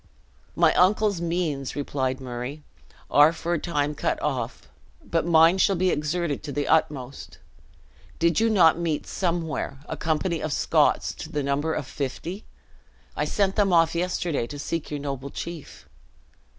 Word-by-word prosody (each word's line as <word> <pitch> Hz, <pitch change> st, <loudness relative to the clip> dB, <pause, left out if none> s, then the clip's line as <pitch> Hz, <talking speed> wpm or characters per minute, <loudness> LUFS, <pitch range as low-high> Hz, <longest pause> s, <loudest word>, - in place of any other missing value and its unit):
"My -, -, +4 dB
uncle's 200 Hz, 0 st, +3 dB
means," 165 Hz, -6 st, -2 dB
replied 130 Hz, -2 st, -2 dB
Murray, 130 Hz, +3 st, -6 dB, 0.5 s
"are 145 Hz, +2 st, +7 dB
for 170 Hz, +1 st, -3 dB
a 170 Hz, -, 0 dB
time 150 Hz, -3 st, -1 dB
cut -, -, -1 dB
off: 125 Hz, -, -3 dB, 0.4 s
but 165 Hz, 0 st, 0 dB
mine 165 Hz, +2 st, +5 dB
shall 195 Hz, -, +4 dB
be 185 Hz, +1 st, +2 dB
exerted 150 Hz, 0 st, -1 dB
to 150 Hz, -, -6 dB
the 145 Hz, +1 st, -2 dB
utmost. 140 Hz, -4 st, -1 dB, 0.8 s
Did 170 Hz, -1 st, +2 dB
you 225 Hz, +1 st, +3 dB
not 175 Hz, -6 st, +5 dB
meet, 165 Hz, -3 st, -1 dB
somewhere, 165 Hz, -6 st, -2 dB
a -, -, -4 dB
company 165 Hz, +1 st, -1 dB
of 155 Hz, -, -2 dB
Scots -, -, +2 dB
to -, -, -9 dB
the 145 Hz, -, -1 dB
number 145 Hz, +3 st, 0 dB
of 145 Hz, -, -3 dB
fifty? 165 Hz, -, -5 dB, 0.7 s
I -, -, 0 dB
sent 195 Hz, -2 st, 0 dB
them 205 Hz, -3 st, +3 dB
off 165 Hz, -1 st, +4 dB
yesterday 170 Hz, -6 st, -1 dB
to 145 Hz, -, -7 dB
seek 145 Hz, +3 st, -4 dB
your 150 Hz, -, -3 dB
noble 140 Hz, -1 st, -5 dB
chief." 155 Hz, -, -8 dB
160 Hz, 155 wpm, -25 LUFS, 140-175 Hz, 0.8 s, are